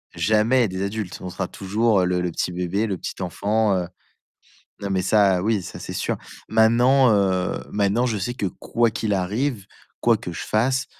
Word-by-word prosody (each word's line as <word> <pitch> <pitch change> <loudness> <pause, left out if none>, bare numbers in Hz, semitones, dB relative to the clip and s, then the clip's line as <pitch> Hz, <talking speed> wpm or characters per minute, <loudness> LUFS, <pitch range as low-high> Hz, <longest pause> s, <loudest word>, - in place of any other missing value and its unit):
jamais 110 +3 +3
des 95 +1 -4
adultes, 100 -2 -4
on 90 - -5
sera 95 +1 -4
toujours 100 0 +1
le 90 0 0
le 90 - -1
petit 90 - -2
bébé, 90 +5 -1
le 95 - -2
petit 95 - -6
enfant, 100 +4 +1
heu, 90 -2 -1 0.9
non, 100 - -3
mais 95 -1 +1
ça, 95 -2 +3
oui, 105 -2 +1
ça, - - -8
c'est - - -7
sûr. - - -2 0.3
Maintenant, 120 +4 +4
heu, 95 -3 +1
maintenant, 105 +4 +1
je 115 -3 -1
sais 120 +6 -3
que 105 - -2
quoi 115 +5 0
qu'il 110 -1 -2
arrive, 105 +4 -1 0.3
quoi - - +4
que - - -7
je - - -6
fasse, 130 +4 0
100 Hz, 185 wpm, -23 LUFS, 95-115 Hz, 0.9 s, Maintenant